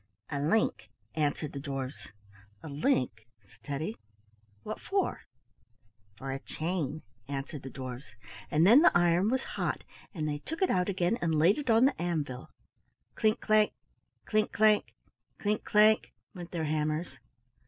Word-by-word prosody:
"A 140 - -1
link," 155 - +1 0.2
answered 150 -1 -1
the 140 - -4
dwarfs. 135 -2 -5 0.6
"A - - -7
link!" 130 - 0 0.2
said 100 - -22
Teddy. 155 +10 -4 0.7
"What 215 - -6
for?" 390 0 -1 0.9
"For 135 +3 -5
a 135 - -3
chain," 155 -1 -3 0.2
answered 140 +1 -5
the 135 - -7
dwarfs, 130 -4 -8 0.3
and 155 +3 +3
then 235 +9 +8
the 330 - +6
iron 175 +3 +3
was 260 +2 0
hot - - -3 0.3
and 155 -5 -3
they 145 -1 -2
took 325 - -3
it 375 - +3
out 180 +1 +1
again 190 +4 0
and 160 -2 +1
laid 175 - +4
it 280 - -4
on 225 +2 +6
the 270 -7 +1
anvil. 150 -7 -3 0.6
Clink 215 +1 +1
clank! 215 -1 +3 0.5
clink 215 -1 +1
clank! 215 -1 +3 0.4
clink 210 +1 -1
clank! 215 +1 +4 0.2
went 175 -3 -8
their 165 -3 -2
hammers. 155 +2 -2
165 Hz, 150 wpm, -30 LUFS, 145-215 Hz, 0.9 s, then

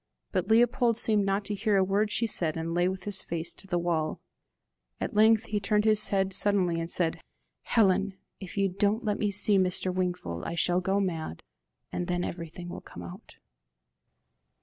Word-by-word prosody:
But - - -1
Leopold 235 +1 +3
seemed 210 -4 +2
not 195 +1 0
to 210 - -3
hear 205 0 +1
a 190 - +4
word 200 +3 +1
she 230 - +1
said, 165 -7 +1
and 165 +1 -3
lay 175 +1 +2
with 190 -1 -6
his 205 0 -1
face 170 0 -4
to 195 - -16
the 175 - -1
wall. 165 -3 -1 0.8
At - - -3
length 220 +1 +5
he 210 - 0
turned 210 +1 +1
his 215 -1 +3
head 195 -1 0
suddenly, 185 -4 +2
and 165 0 -4
said, 170 -2 +1 0.4
"Helen, 195 -3 +2 0.2
if 190 0 -9
you 195 0 +3
don't 205 +5 0
let 210 -1 -1
me 210 - +1
see 200 0 +4
Mr. 185 0 +2
Wingfold, 175 - -3
I 170 - -4
shall 175 +1 +1
go 190 +2 0
mad, 165 - -3 0.5
and 175 - -3
then 175 -1 -1
everything 170 0 -6
will 175 - -7
come 90 - -11
out." 85 +1 -11
190 Hz, 190 wpm, -28 LUFS, 175-210 Hz, 0.8 s, length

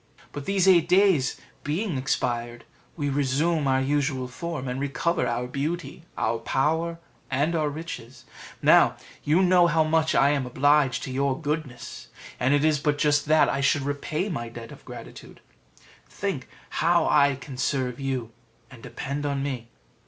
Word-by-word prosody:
But 145 -1 -7
these 195 -1 +2
eight 170 -3 +5
days 180 -8 +3 0.2
being 165 +4 -2
expired, 120 -3 -2 0.3
we 145 -3 -1
resume 145 +3 +1
our 130 0 +3
usual 135 -2 0
form, 145 +1 -5
and 125 +1 -3
recover 140 +5 0
our 120 +1 -1
beauty, 145 +4 -4
our 115 +1 0
power, 160 +8 0 0.3
and 145 +6 0
our 155 -2 +1
riches. 145 -5 -8 0.4
Now - - +6 0.3
you 160 +6 +3
know 180 -1 +5
how 160 -1 +3
much 160 0 +1
I 140 +1 +5
am 140 -3 -1
obliged 135 -1 +2
to - - -5
your 135 0 0
goodness, 150 -4 -5 0.3
and 130 - +2
it 145 +1 +3
is 155 -2 +3
but 145 0 0
just 150 0 +2
that 155 0 +5
I 140 - -1
should 140 +1 +2
repay 145 +5 -2
my 120 - -4
debt 115 0 -10
of - - -13
gratitude: - - -11 0.7
think - - -4 0.3
how - - +3
I 140 -1 +4
can 135 +1 -10
serve 130 -1 -1
you 130 -4 -3 0.4
and 125 - -13
depend 140 +5 -5
on 140 -1 -1
me." 125 -5 -4
145 Hz, 160 wpm, -25 LUFS, 130-155 Hz, 0.7 s, Now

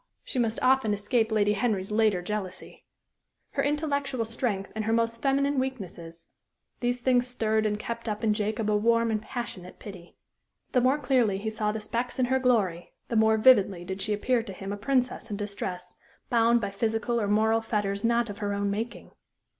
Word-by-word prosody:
she 255 - -2
must 230 -2 +1
often 255 -5 +3
escape 220 +2 0
Lady 210 -1 +3
Henry's 205 -2 -1
later 210 -4 +2
jealousy; 195 -2 -6 0.7
her - - 0
intellectual 285 -4 -1
strength 220 -4 -2
and 220 -1 -3
her 225 - 0
most 230 0 0
feminine 280 0 +2
weaknesses; 180 -10 -5 0.5
these 245 0 -1
things 250 -1 +3
stirred 220 -3 0
and 210 0 -1
kept 230 +1 -5
up 210 +1 -4
in 215 -1 +3
Jacob 210 0 -1
a 210 - +2
warm 230 +2 +2
and 215 -1 0
passionate 200 -7 -7
pity. 185 -4 -11 0.5
The 250 - +3
more 260 +4 +3
clearly 245 -9 +2
he 220 +2 -3
saw 215 -1 -1
the 220 - -4
specks 235 +3 -3
in 255 - +2
her 260 +2 +1
glory, 205 -9 +1 0.2
the 235 - -2
more 220 0 +4
vividly 200 -7 +4
did 190 +1 -5
she 210 +2 -2
appear 235 +4 +1
to 225 -4 -8
him 195 +1 -6
a - - -2
princess 255 +3 0
in 205 - -3
distress, 200 -3 -5 0.4
bound 235 0 +4
by 200 -2 -2
physical 225 +3 -1
or 205 - 0
moral 220 +2 +3
fetters 205 -3 -2
not 235 0 +2
of 205 0 -8
her 205 -1 -1
own 200 0 0
making. 225 +4 -5
220 Hz, 190 wpm, -27 LUFS, 205-245 Hz, 0.7 s, more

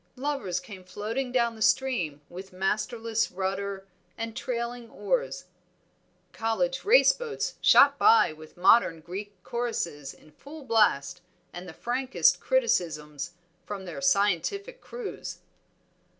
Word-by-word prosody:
Lovers 255 -10 -2
came 190 -1 -11
floating 220 +7 -4
down 235 -2 +1
the 220 - -13
stream 190 - +1
with 190 +2 -10
masterless 220 +4 -1
rudder 195 +1 -3 0.3
and 225 -1 -5
trailing 240 -1 -4
oars. - - -2 0.9
College 260 +4 -1
race 475 +5 +6
boats 475 -3 -4
shot - - +6
by 435 - +5
with 155 +1 -14
modern 180 -3 +4
Greek 200 +5 -7
choruses 170 - -3
in 155 - -19
full 290 - -12
blast 180 - +2 0.3
and 175 0 -8
the - - -7
frankest 255 +7 +1
criticisms 160 - -1 0.3
from 200 -2 -7
their 165 -6 -7
scientific 205 - +1
crews. 475 -4 -7
215 Hz, 120 wpm, -27 LUFS, 180-255 Hz, 0.9 s, race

